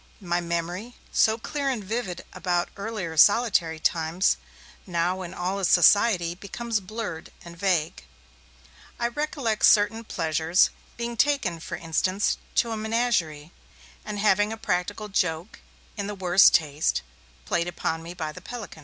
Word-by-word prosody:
My 175 -3 -1
memory, 175 +7 -4 0.2
so 220 0 +3
clear 280 +4 -3
and 240 -6 -2
vivid 205 -3 -4
about 175 -1 -1
earlier 200 -5 -5
solitary 180 -4 +4
times, 165 +3 +1 0.5
now 180 +1 0
in 175 -2 -6
all 185 +1 -2
this 190 - +1
society 180 -1 +5
becomes 215 +5 -3
blurred 200 -4 -6
and 170 0 -10
vague. 170 - 0 1.0
I 235 0 +1
recollect 260 -5 -2
certain 215 +2 +5
pleasures; 165 -2 +1 0.3
being 235 0 -4
taken, 250 - +1
for - - -6
instance, 185 +4 0 0.2
to 230 - +2
a 225 - -2
menagerie, 215 -9 -1 0.5
and 210 -1 -5
having 205 0 +3
a 225 - -5
practical 205 +1 -2
joke, 175 -1 -2 0.4
in 200 -2 -4
the 210 - -4
worst 185 0 +6
taste, 150 -1 +1 0.4
played 170 0 0
upon 165 -2 -3
me 170 +2 -9
by 155 -3 -4
the - - -11
pelican. 235 -9 -8
190 Hz, 145 wpm, -25 LUFS, 170-220 Hz, 1.0 s, worst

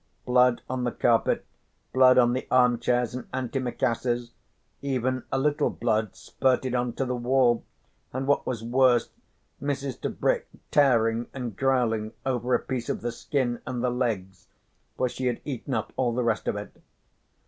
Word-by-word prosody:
Blood 125 -1 +4
on 130 -1 -2
the 120 - 0
carpet, 115 -1 +2 0.5
blood 130 -1 +6
on 120 -1 +5
the 130 - -3
armchairs 125 -1 +3
and 125 - -7
antimacassars, 120 -2 -1 0.5
even 130 -2 -1
a - - +1
little 145 +2 +1
blood 110 -3 -1
spurtled 130 -1 0
on 125 -1 0
to 135 - -2
the 125 0 -2
wall, 125 -1 +2 0.5
and 130 +1 -3
what 140 +1 +1
was 115 -3 -3
worse, 125 0 +3 0.5
Mrs. 140 -2 -3
Tebrick - - 0 0.2
tearing 115 -5 +3
and 125 -6 -4
growling 115 -4 +1
over 125 -1 +1
a - - +2
piece 125 -3 -4
of - - -2
the 120 - -2
skin 120 0 -2
and 125 -1 -3
the 125 - +2
legs, 105 -7 -3 0.5
for 130 - +2
she 130 +1 -3
had 120 - -1
eaten 135 -2 -3
up 110 - -3
all 120 -3 0
the 125 - 0
rest 115 -2 0
of - - 0
it. 105 0 -7
125 Hz, 160 wpm, -26 LUFS, 120-130 Hz, 0.5 s, blood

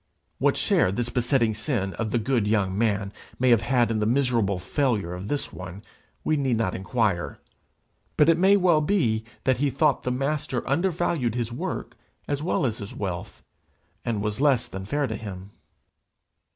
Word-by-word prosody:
What - - +2
share 90 - +3
this 120 +4 -2
besetting 120 -2 +2
sin 105 -4 -2
of 110 -1 -3
the 120 - +1
good 115 -1 +1
young 100 -3 +1
man 105 -2 0 0.2
may 130 0 +3
have 115 - +5
had 120 0 +2
in 110 - 0
the 105 - +1
miserable 120 -6 +2
failure 105 -2 -1
of 90 +2 -6
this 145 +4 -3
one, 95 +3 -8 0.4
we 155 - +2
need 130 -5 +1
not 100 -5 0
inquire; 95 - -1 0.8
but 150 - +5
it 165 0 +4
may 195 +2 +6
well 175 -5 +4
be 145 - +1 0.2
that 130 -1 +2
he 140 +2 +1
thought 140 +1 +2
the - - -2
Master 135 0 -2
under 170 +8 +2
valued 160 - -1
his 120 -1 -2
work 120 - -4 0.3
as 145 0 -1
well 155 -3 0
as 110 -3 -1
his 100 - -7
wealth, 95 -4 -5 0.6
and 110 -4 -1
was 105 +4 -2
less 135 -5 +3
than 95 0 -7
fair 145 +7 0
to 110 -4 -3
him. 100 -2 -8
120 Hz, 180 wpm, -25 LUFS, 105-140 Hz, 0.8 s, may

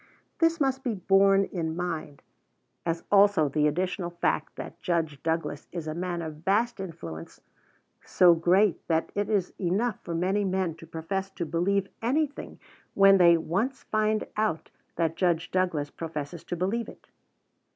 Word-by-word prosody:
This 330 0 +3
must 265 -2 0
be 240 -5 -1
borne 195 +1 +4
in 165 -4 -3
mind, 165 -5 -4 0.6
as 165 0 -1
also 200 -6 +5
the 150 +2 +2
additional 180 +3 -1
fact 175 0 -1
that - - -9
Judge 165 -6 -1
Douglas 160 -2 -2
is 170 -3 -5
a 155 - -3
man 175 0 -3
of 155 -2 -6
vast 210 +8 0
influence, 85 - -8 0.6
so 175 -1 +5
great 180 +3 +3
that 160 -1 0
it 205 0 -1
is 200 -4 0
enough 200 +5 0
for 170 - -5
many 190 +4 +1
men 190 -3 0
to 165 - -13
profess 190 +4 -4
to 185 -3 -5
believe 185 +5 0
anything 285 +5 -1 0.4
when 195 -1 +6
they 170 -1 +7
once 200 - -2
find 215 0 0
out 215 -7 -1 0.2
that 165 -1 0
Judge 170 -3 +1
Douglas 170 -6 0
professes 160 0 -6
to - - -3
believe 195 +7 -1
it. - - -15
180 Hz, 155 wpm, -27 LUFS, 165-200 Hz, 0.6 s, they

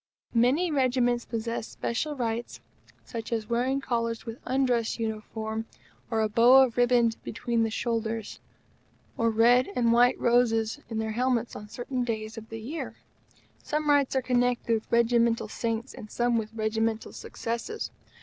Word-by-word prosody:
Many 260 +9 +3
Regiments 250 -3 +1
possess 230 -1 -3
special 295 +6 -3
rights, 235 -2 -3 0.5
such 230 -2 -6
as 225 -2 -1
wearing 250 +4 +1
collars 230 -4 -2
with 230 +1 -7
undress 250 -3 +1
uniform, 220 0 -4 0.4
or 225 -1 +1
a 215 - +2
bow 240 +5 +7
of 245 -3 -1
ribbon 245 -1 +4
between 235 +1 -1
the 225 - +2
shoulders, 225 -1 -3 0.8
or 230 0 +2
red 240 - +4
and 235 -1 +3
white 245 +2 +4
roses 235 0 +2
in 225 - -4
their 220 0 -1
helmets 240 0 0
on 210 0 -9
certain 250 +2 -3
days 220 -2 -3
of 225 0 -9
the 225 - -6
year. 280 +9 -5 0.7
Some 300 0 0
rights 280 -2 +3
are 260 - +1
connected 245 -1 +1
with 220 -1 -2
regimental 235 -1 +3
saints, 230 +3 -3
and 215 - -10
some 240 +1 +1
with 220 -1 -1
regimental 220 0 -1
successes. 235 - -5
235 Hz, 150 wpm, -27 LUFS, 225-245 Hz, 0.8 s, bow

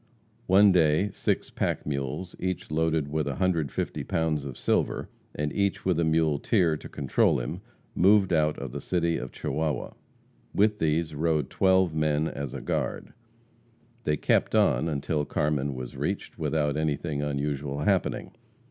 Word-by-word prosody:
One 100 +2 +6
day, 85 +3 +3
six - - -1
pack - - -2
mules, 70 +5 -3
each 95 -4 -3
loaded 80 -1 +1
with 75 0 -1
150 80 +1 -1
pounds 80 -3 0
of 65 -3 -7
silver, - - 0 0.3
and 75 0 -2
each 100 -1 0
with 90 -3 +2
a - - +3
muleteer 80 - +2
to - - -9
control 70 -3 +1
him, - - -5 0.3
moved 95 0 +4
out 75 -1 +2
of 70 -3 -6
the - - -5
City 85 -2 0
of 65 - -6
Chihuahua. 80 -1 -2 0.6
With 105 +1 +3
these 80 0 0
rode 75 -2 0
twelve 95 -3 +3
men 75 0 +1
as 70 -4 -5
a - - -5
guard. - - -3 0.9
They 75 0 +1
kept - - +1
on 80 - +3
until 75 +1 -1
Carmen 70 -2 -1
was 65 -1 -7
reached, - - -4
without 75 -2 0
anything 75 -1 -1
unusual 70 0 -2
happening. 95 +3 0
75 Hz, 150 wpm, -27 LUFS, 75-85 Hz, 0.9 s, One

